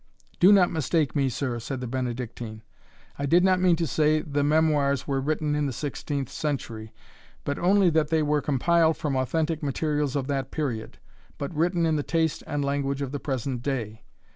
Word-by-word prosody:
"Do 185 +3 +7
not 190 -3 +5
mistake 160 -1 0
me, 135 -2 +2
sir," 125 -1 -3
said 130 +3 -5
the 125 - -4
Benedictine; 120 -3 -4 0.6
"I 140 - -1
did 175 +5 +4
not 185 -1 +3
mean 180 -2 +5
to 165 0 -1
say 155 +2 +2
the 145 -1 -1
Memoirs 145 -3 +2
were 135 -2 0
written 150 +1 -1
in 150 -1 0
the - - -2
sixteenth 140 +1 -3
century, 115 -7 -4 0.5
but 145 - -3
only, 190 0 +4
that 155 -1 +2
they 160 0 +1
were 150 0 +1
compiled 160 +4 +2
from 150 -4 -2
authentic 155 +4 0
materials 145 0 -1
of 140 -2 0
that 135 -2 -2
period, 125 -8 -4 0.4
but 140 +3 -4
written 170 +2 +1
in 160 -1 +2
the - - 0
taste 160 +1 0
and 145 -1 -1
language 140 0 -1
of 135 - -4
the 145 - -3
present 130 -3 -3
day. 120 -5 -3
145 Hz, 190 wpm, -26 LUFS, 135-160 Hz, 0.6 s, Do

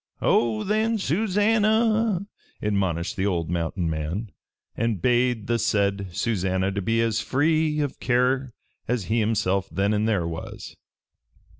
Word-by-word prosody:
"Oh, 110 -2 +2
then, 220 +2 +1
Susannah!" 215 +2 +2 0.3
admonished 100 -1 -1
the 95 +1 +1
old 85 -4 -1
mountain 85 +1 -1
man, 80 +7 -3 0.4
and 115 -4 -1
bade 120 0 +1
the 120 +1 0
said 100 -2 +1
Susannah 95 -2 0
to 100 0 -2
be 115 +4 0
as 115 -1 +1
free 155 +2 +1
of 145 -2 -3
care 130 +1 +1 0.4
as 120 -3 0
he 110 +5 0
himself 100 -3 0
then 100 +2 +1
and 105 +1 +1
there 100 -7 +1
was. 80 -1 -7
115 Hz, 135 wpm, -25 LUFS, 95-145 Hz, 0.4 s, Oh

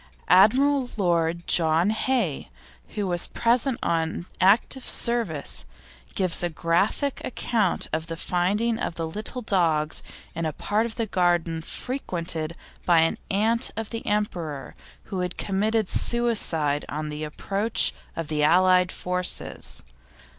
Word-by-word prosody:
Admiral 255 +8 +5
Lord 170 -3 +1
John 165 +3 +3
Hay, 220 - -1 0.5
who 205 - -1
was 175 -2 -1
present 240 +2 +1
on 165 +1 -1
active 220 +7 +3
service, 225 -12 -1 0.5
gives 185 -3 0
a 175 - 0
graphic 175 - 0
account 225 -6 0
of 160 +1 -2
the 165 -1 -5
finding 205 +8 0
of - - -3
these 160 -1 -4
little 240 +4 -3
dogs 160 -7 +1 0.3
in 165 0 -2
a 155 - -3
part 215 +8 0
of 225 - -9
the 230 - -1
garden 175 -4 +1
frequented 170 - -4 0.3
by 170 -2 +5
an 165 - +1
aunt 220 +4 +3
of 225 -1 -4
the 230 - -4
Emperor, 170 -9 -2 0.3
who 195 -3 -5
had 180 -1 -3
committed 210 +2 0
suicide 175 -14 +1
on 155 +1 -4
the 150 +1 -5
approach 200 +8 0 0.2
of 165 -2 -4
the 150 -1 -1
Allied 180 +3 +4
Forces. 180 0 -2
180 Hz, 130 wpm, -25 LUFS, 165-220 Hz, 0.5 s, Admiral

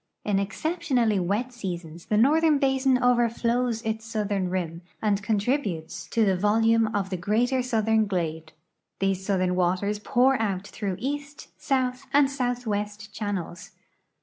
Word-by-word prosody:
In 205 -2 +1
exceptionalh'^ 240 - 0
wet 215 +8 -1
seasons 175 -7 -6
tlie 210 - +2
northern 305 +5 +4
basin 265 -1 +2
overflows 240 -1 +1
its 220 0 -2
southern 205 -4 -2
rim, 170 -2 -3 0.2
and 205 -2 +1
contributes 205 - -1
to 225 -2 +2
the 190 -2 +3
volume 225 +3 +3
of 195 -1 -1
the 185 - -1
greater 235 +8 +1
southern 220 -3 +1
glade. 160 -4 -3 0.5
These 195 -1 0
southern 185 -2 +1
waters 185 +3 0
pour 255 +3 +2
out 200 -3 -1
through 200 -2 -4
east, 285 +3 -5
south, 255 -2 -1
and 280 -1 +5
southwest 220 -5 -3
channels. 195 -5 -5
215 Hz, 135 wpm, -26 LUFS, 195-250 Hz, 0.5 s, and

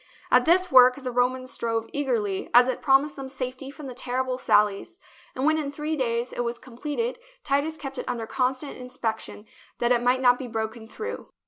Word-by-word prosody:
At 250 0 +5
this 365 +2 +3
work 255 -1 +8
the 260 -3 -5
Romans 255 +1 0
strove 225 -1 -2
eagerly, 230 -9 -1
as 245 +1 +8
it 260 - -2
promised 280 +2 +3
them 270 -1 -7
safety 260 0 -5
from 290 +1 -10
the 260 - -6
terrible 255 +1 -2
sallies; 210 - +2 0.4
and 260 - -1
when 315 +1 +3
in 285 -2 -3
three 300 +2 -3
days 240 -3 -1
it - - -7
was 235 0 -2
completed, 300 - -4 0.2
Titus 290 +3 0
kept 275 -3 -6
it - - -5
under 235 -2 -3
constant 260 +3 -2
in 250 - -8
spection 220 -3 -4 0.3
that 240 0 +1
it 240 -1 +3
might 250 +1 +3
not 245 -1 +4
be 260 - -5
broken 220 0 -4
through. 440 - -6
255 Hz, 200 wpm, -25 LUFS, 240-280 Hz, 0.4 s, work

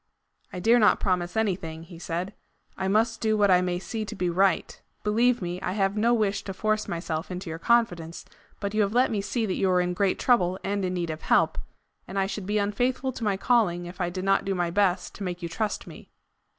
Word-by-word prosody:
"I 180 - -5
dare 230 +6 +4
not 210 - +5
promise 180 0 -1
anything." 175 -7 -1
he 170 0 -12
said. 175 +4 -3 0.4
"I 190 - -2
MUST 220 +3 +1
do 220 -1 +2
what 205 -2 +4
I 180 0 +5
may 180 -1 -1
see 220 +4 -4
to 215 +1 -7
be 180 -2 -1
right. 190 +2 +1 0.2
Believe 230 +1 +2
me, 175 +1 -4
I 185 - -2
have 195 0 +1
no 225 +3 +2
wish 210 -4 +1
to 195 - -5
force 215 +1 0
myself 165 -2 -3
into 180 -2 -5
your 165 - -6
confidence, 175 -7 +1 0.3
but 200 -1 -3
you 215 - +2
have 205 0 +1
let 250 +2 +3
me 210 -3 0
see 225 +3 -1
that 190 - -1
you 190 - +2
are 180 0 +3
in 180 0 0
great 190 +1 +1
trouble 185 -7 +2
and 200 0 -1
in 185 0 -1
need 170 -2 -2
of 155 - -7
help, - - +2 0.5
and 195 - -6
I 195 - +2
should 195 -1 -5
be 210 +1 +1
unfaithful 245 +6 0
to 240 - -7
my 205 -3 +1
calling 195 -7 +2
if 175 +2 -8
I 175 - 0
did 185 +1 -5
not 195 0 +3
do 195 0 -1
my 175 -1 -1
best 190 -1 +1
to 205 - -6
make 180 -1 -4
you 170 - -3
trust 210 +5 -2
me." - - -12
195 Hz, 240 wpm, -26 LUFS, 180-215 Hz, 0.5 s, not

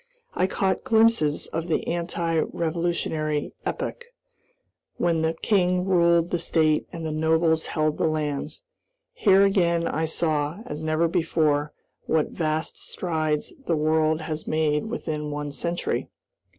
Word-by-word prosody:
I 185 - +1
caught 190 0 0
glimpses 220 -10 +3
of 165 +1 -4
the 165 - 0
anti 170 -1 -1
revolutionary 160 -3 -1
epoch, 485 - -4 0.9
when 165 -2 +1
the 160 0 0
king 180 -3 +2
ruled 170 -2 +3
the 175 - 0
state 155 -2 +2
and 165 -2 -6
the 160 - -2
nobles 160 +1 +2
held 155 -1 0
the - - +2
lands. 150 - -2 0.5
Here 200 - +5
again 170 -4 +2
I 160 +1 -1
saw, 155 +2 -1
as 150 +1 -6
never 155 +1 +1
before, 155 -3 +1 0.4
what 160 -1 +1
vast 155 -1 -2
strides 155 -4 -2
the 170 - +2
world 155 +1 +2
has 155 0 -5
made 155 +2 +1
within 155 -9 -4
one 145 0 -4
century. 170 +4 -2
160 Hz, 135 wpm, -25 LUFS, 155-170 Hz, 0.9 s, Here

